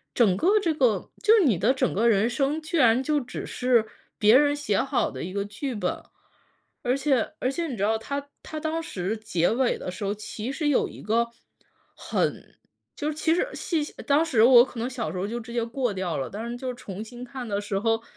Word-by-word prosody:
整 205 -7 +4
个 400 - +3
这 335 -5 0
个 250 -7 +1
就 430 - +5
你 205 -10 +2
的 235 +7 +3
整 260 -1 +1
个 230 +4 +2
人 215 0 +4
生， 275 +5 0
居 315 +2 -3
然 245 -2 +4
就 295 +1 +1
只 245 - -6
是 245 -3 +2 0.3
别 215 +2 +6
人 290 +1 +5
写 285 -9 0
好 270 - 0
的 - - -6
一 185 - -5
个 200 +1 -2
剧 240 +6 -5
本。 205 - -2 0.8
而 250 +3 +2
且 275 -1 +1
而 255 - 0
且 335 +4 -2
你 255 - -5
知 200 - -1
道 220 +1 +2
它 280 +5 -5 0.2
它 310 - -6
当 320 +1 -2
时 190 - -3
结 180 -6 0
尾 250 +2 +1
的 - - -6
时 185 +4 -6
候， 200 0 0
其 215 +3 -6
实 295 +2 -2
有 285 - +2
一 - - -11
个 230 +3 +1 0.7
很 - - -2 0.4
就 295 - -3
是 310 - -1
其 320 +1 +2
实 355 +8 +1
细 320 -4 -1 0.2
当 295 +3 +3
时 235 -9 +3
我 245 0 +8
可 250 - -13
能 240 - -2
小 240 - -3
时 185 - -6
候 185 - -1
就 235 +3 -4
直 235 0 -9
接 235 -1 0
过 235 -1 -2
掉 185 -4 -2
了， 135 - -3
但 225 +4 -6
是 240 - -4
就 255 0 -4
重 200 -4 -8
新 240 +2 -10
看 250 -1 -7
的 205 -1 -1
时 200 -1 -2
候， 225 +1 +1
240 Hz, 250 characters per minute, -26 LUFS, 215-280 Hz, 0.8 s, 我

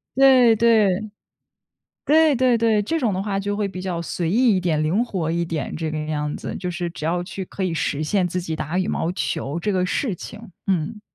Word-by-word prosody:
对 260 -4 +6
对。 215 -3 +3 0.9
对 310 0 +5
对 250 -1 +3
对， 220 -2 +2
这 325 +10 -1
种 225 -9 0
的 190 - -2
话 195 -1 -2
就 205 +1 -2
会 210 -1 -1
比 185 -1 -7
较 175 -3 -3
随 170 0 -3
意 225 +1 +3
一 - - +2
点， 160 -4 0
灵 180 +10 +1
活 180 -9 -2
一 170 +1 0
点， 160 -4 -4
这 160 0 -3
个 155 - -3
样 150 -1 -2
子。 - - -6
就 180 - -4
是 175 0 -3
只 160 - -8
要 175 +2 0
去 190 +1 -6
可 190 - -7
以 185 - 0
实 155 -2 -1
现 185 +3 +1
自 180 +1 -2
己 165 -3 -4
打 155 +4 -3
羽 185 0 0
毛 165 - -1
球 135 +1 -3
这 210 - -1
个 185 -1 +1
事 215 +4 -1
情。 215 +4 -10 0.2
嗯。 190 +3 -1
185 Hz, 240 characters per minute, -22 LUFS, 165-215 Hz, 0.9 s, 对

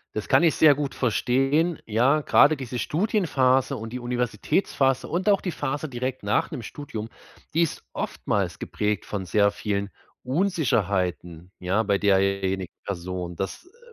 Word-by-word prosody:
Das 110 - -3
kann - - +5
ich 165 - +4
sehr 155 -2 +7
gut 140 -1 -4
verstehen. 135 +7 +1
Ja, 125 +8 +2
gerade 145 +1 +5
diese 125 -2 -5
Studienphase 140 - +1
und 110 +2 -7
die 125 - -3
Universitätsphase 125 +3 0
und 185 +5 0
auch 200 - +4
die 180 - -3
Phase 145 +1 -3
direkt 130 -2 -4
nach 105 - +1
dem 120 - -6
Studium. 115 -3 -7 0.4
Die 165 - +3
ist 165 - -1
oftmals - - -2
geprägt 105 -1 -2
von 100 -3 -4
sehr 100 +3 +3
vielen 100 -1 -3 0.3
Unsicherheiten. 100 - -1
Ja, 95 +5 +1
bei 100 -1 +2
derjenigen 95 -2 +1
Person, 90 -2 -4
das, 95 - -5
äh 445 +7 -23
125 Hz, 150 wpm, -25 LUFS, 100-145 Hz, 0.4 s, sehr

